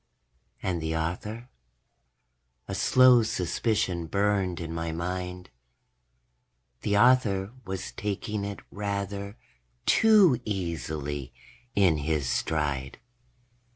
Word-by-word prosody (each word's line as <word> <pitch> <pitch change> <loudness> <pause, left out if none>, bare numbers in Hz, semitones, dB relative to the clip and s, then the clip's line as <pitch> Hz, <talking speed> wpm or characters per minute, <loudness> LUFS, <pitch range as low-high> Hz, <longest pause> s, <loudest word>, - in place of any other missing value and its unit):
And 90 -3 -1
the 80 0 -1
author? 105 +9 -4 1.2
A - - -4
slow 130 -1 +6
suspicion 100 -3 -1
burned 100 -1 0
in 85 -1 -5
my 85 0 -3
mind. 90 0 -4 1.3
The 100 0 +1
author 105 -5 +4
was 95 -1 -5
taking 105 0 -3
it 100 -1 -5
rather 100 0 -4 0.5
too 200 - +5
easily 75 - -4 0.4
in 95 -6 +4
his 75 -2 -1
stride. 70 -2 -1
95 Hz, 90 wpm, -27 LUFS, 80-105 Hz, 1.3 s, slow